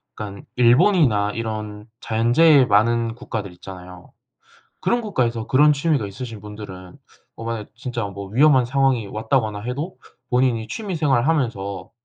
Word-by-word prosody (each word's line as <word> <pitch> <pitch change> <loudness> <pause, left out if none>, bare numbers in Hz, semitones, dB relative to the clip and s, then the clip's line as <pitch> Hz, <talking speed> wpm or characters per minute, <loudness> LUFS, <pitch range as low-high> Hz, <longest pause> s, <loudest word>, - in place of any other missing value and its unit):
그러니깐 100 -2 -8
일본이나 120 - +4
이런 105 -2 -5 0.2
자연재해 130 +6 +4
많은 115 +2 +2
국가들이 110 -6 -6
있잖아요. 90 0 -11 0.7
그런 240 0 +1
국가에서 120 - -1
그런 150 +3 +5
취미가 140 -6 0
있으신 110 +2 -8
분들은 95 -3 -10 0.4
어 115 - -9
만약 115 -2 -4
진짜 120 -1 -4
뭐 100 0 -7
위험한 130 +3 +4
상황이 130 -3 +1
왔다거나 110 -1 -1
해도 140 - -5 0.3
본인이 125 -3 +1
취미 200 - -5
생활하면서 120 - 0
115 Hz, 345 characters per minute, -21 LUFS, 105-135 Hz, 0.7 s, 그런